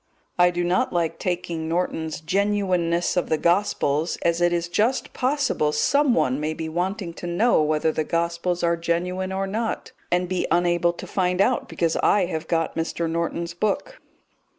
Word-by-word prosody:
I 180 Hz, 0 st, +6 dB
do 175 Hz, 0 st, -2 dB
not 175 Hz, +1 st, +1 dB
like 170 Hz, -2 st, -1 dB
taking 170 Hz, -3 st, -3 dB
Norton's 165 Hz, -2 st, -2 dB
Genuineness 185 Hz, -2 st, +1 dB
of 180 Hz, -, 0 dB
the 160 Hz, -, +2 dB
Gospels, 170 Hz, -3 st, +1 dB
as 170 Hz, 0 st, +1 dB
it 175 Hz, 0 st, +4 dB
is 170 Hz, -1 st, 0 dB
just 220 Hz, +9 st, 0 dB
possible 255 Hz, -, +1 dB
someone 240 Hz, -, +2 dB
may 155 Hz, +1 st, -2 dB
be 160 Hz, 0 st, -4 dB
wanting 180 Hz, +2 st, -2 dB
to 175 Hz, -, -7 dB
know 185 Hz, +4 st, +3 dB
whether 155 Hz, +1 st, +1 dB
the 155 Hz, -, -1 dB
Gospels 170 Hz, +2 st, -1 dB
are 170 Hz, 0 st, +3 dB
genuine 180 Hz, +3 st, -2 dB
or 190 Hz, +1 st, -1 dB
not, 220 Hz, +4 st, -3 dB, 0.2 s
and 180 Hz, +1 st, +1 dB
be 185 Hz, 0 st, -1 dB
unable 175 Hz, 0 st, +2 dB
to -, -, -8 dB
find 180 Hz, -1 st, 0 dB
out 245 Hz, +5 st, +2 dB
because 165 Hz, -1 st, 0 dB
I 205 Hz, -3 st, +3 dB
have 160 Hz, -2 st, -4 dB
got 165 Hz, -1 st, 0 dB
Mr. 165 Hz, +1 st, -2 dB
Norton's 170 Hz, +1 st, -2 dB
book. 215 Hz, -, -2 dB
175 Hz, 170 wpm, -24 LUFS, 165-185 Hz, 0.2 s, I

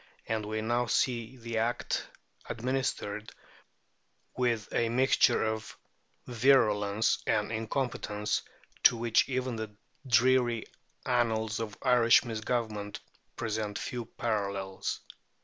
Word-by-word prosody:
And 110 Hz, -1 st, -2 dB
we 110 Hz, 0 st, -2 dB
now 120 Hz, +2 st, +1 dB
see 120 Hz, +1 st, 0 dB
this 115 Hz, -1 st, -4 dB
Act 115 Hz, +2 st, -1 dB, 0.4 s
administered 115 Hz, -4 st, -2 dB, 1.0 s
with 120 Hz, -4 st, 0 dB
a 115 Hz, -1 st, +2 dB
mixture 130 Hz, +3 st, +4 dB
of 110 Hz, 0 st, -4 dB, 0.5 s
virulence 110 Hz, -4 st, +3 dB
and 105 Hz, 0 st, +1 dB
incompetence 110 Hz, -2 st, -2 dB, 0.4 s
to 120 Hz, -, +6 dB
which 115 Hz, +2 st, +2 dB
even 130 Hz, -2 st, -1 dB
the 110 Hz, -2 st, -6 dB, 0.3 s
dreary 125 Hz, -2 st, +3 dB, 0.4 s
annals 110 Hz, -3 st, +1 dB
of 110 Hz, -3 st, -5 dB
Irish 125 Hz, -2 st, +5 dB
misgovernment 110 Hz, -2 st, -3 dB, 0.4 s
present 110 Hz, -2 st, -2 dB
few 120 Hz, -2 st, -4 dB
parallels. 100 Hz, -4 st, -3 dB
115 Hz, 100 wpm, -30 LUFS, 110-120 Hz, 1.0 s, to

